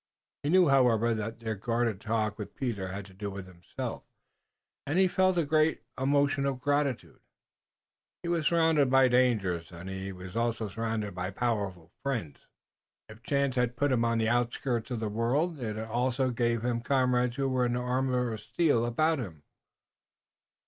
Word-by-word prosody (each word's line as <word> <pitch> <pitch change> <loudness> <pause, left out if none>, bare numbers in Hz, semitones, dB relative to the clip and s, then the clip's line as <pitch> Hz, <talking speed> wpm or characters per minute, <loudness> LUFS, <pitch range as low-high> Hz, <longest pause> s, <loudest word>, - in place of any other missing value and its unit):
He 145 - -2
knew, 180 +1 +5
however, 120 -4 +4
that 110 +1 -4
their 110 -1 -2
guarded 115 0 -1
talk 110 -1 -1
with 105 - -7
Peter 110 -8 -3
had 95 +1 -6
to 95 - -15
do 100 +2 -5
with 100 -1 -7
himself, 90 -2 -6 0.9
and 145 +5 0
he 190 0 +5
felt 185 0 +2
a 170 - +2
great 155 +2 +2
emotion 140 +1 +2
of 135 -2 -2
gratitude. 145 -2 -1
If - - -54
he 170 - -3
was 165 -3 +1
surrounded 160 -5 +3
by 135 0 +5
dangers 105 -9 +2
he 95 +2 -6
was 90 +1 -9
also 115 -2 -1
surrounded 110 -1 -3
by 90 +1 -3
powerful 100 -6 -2
friends. 120 - -3 0.7
If 110 +1 -13
chance 140 0 0
had 120 -1 0
put 145 +1 +2
him 120 -2 +2
on 115 0 +1
the 110 -1 +1
outskirts 120 0 0
of 120 -3 -3
the 110 - -2
world 135 +10 0
it 110 -4 -3
had 110 +1 -5
also 125 +3 0
given 120 -1 0
him 120 -1 0
comrades 125 -1 +1
who 135 -1 0
were 130 -1 +1
an 120 0 0
armor 125 -1 0
of 110 - -5
steel 145 -7 +1
about 155 +6 +1
him. 85 - -7
120 Hz, 175 wpm, -29 LUFS, 110-135 Hz, 0.9 s, knew